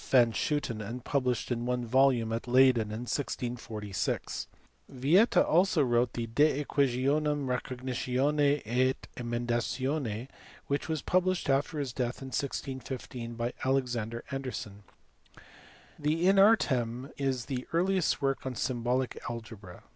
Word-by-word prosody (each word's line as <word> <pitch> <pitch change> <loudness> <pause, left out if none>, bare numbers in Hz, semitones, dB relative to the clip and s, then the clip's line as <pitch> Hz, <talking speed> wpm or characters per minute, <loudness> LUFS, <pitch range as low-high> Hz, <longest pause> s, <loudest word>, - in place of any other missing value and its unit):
van 120 -3 +5
Schooten 125 -5 -1
and 115 +4 -6
published 125 -4 0
in 120 0 -1
one 125 -1 -1
volume 125 -2 +3
at 115 +2 -3
Leyden 125 -3 +5
in 110 +2 -5
1646. 120 -6 -3 0.4
Yieta 155 - +4
also 175 -2 +4
wrote 120 -1 +2
the 115 - -2
De 145 +5 +2
JEquationum 140 +2 +1
Recognitions 130 +3 0
et 130 +4 0
Emendations 120 +1 -2 0.4
which 140 +3 -2
was 160 -2 -2
published 185 -4 +1
after 140 +3 0
his 140 -5 -3
death 125 -1 -2
in 135 - -6
1615 130 -3 -4
by 120 +1 -2
Alexander 120 -4 -1
Anderson. 125 -7 -5 1.2
The 155 +4 +1
In 195 0 +5
Artem 130 - +3
is 130 -4 -1
the 130 -3 -4
earliest 180 -3 +1
work 135 0 0
on 130 -1 -4
symbolic 125 +1 -1
algebra. 110 -6 -9
130 Hz, 125 wpm, -30 LUFS, 120-140 Hz, 1.2 s, van